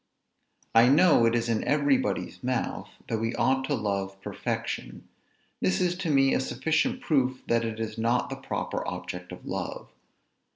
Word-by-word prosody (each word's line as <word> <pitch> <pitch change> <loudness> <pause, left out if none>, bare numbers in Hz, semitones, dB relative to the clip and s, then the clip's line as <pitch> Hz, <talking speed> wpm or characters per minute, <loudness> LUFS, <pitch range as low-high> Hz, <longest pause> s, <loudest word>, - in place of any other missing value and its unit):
I 115 +2 +7
know 150 -5 +6
it 115 - +2
is 120 0 0
in 115 -2 0
every 145 -2 +3
body's - - -3
mouth, 130 0 -2 0.2
that 110 - -1
we 115 +1 -1
ought 135 0 +2
to 145 - 0
love 100 -3 -2
perfection. - - -4 0.5
This 90 0 +2
is 180 -1 +1
to 180 -3 -3
me 135 -2 +4
a - - +2
sufficient 160 - 0
proof, 130 - +1
that 115 0 +2
it 115 -1 -4
is 110 0 -4
not 120 +2 +1
the - - -2
proper - - -3
object 90 0 -6
of - - -10
love. - - -5
125 Hz, 170 wpm, -27 LUFS, 110-145 Hz, 0.5 s, I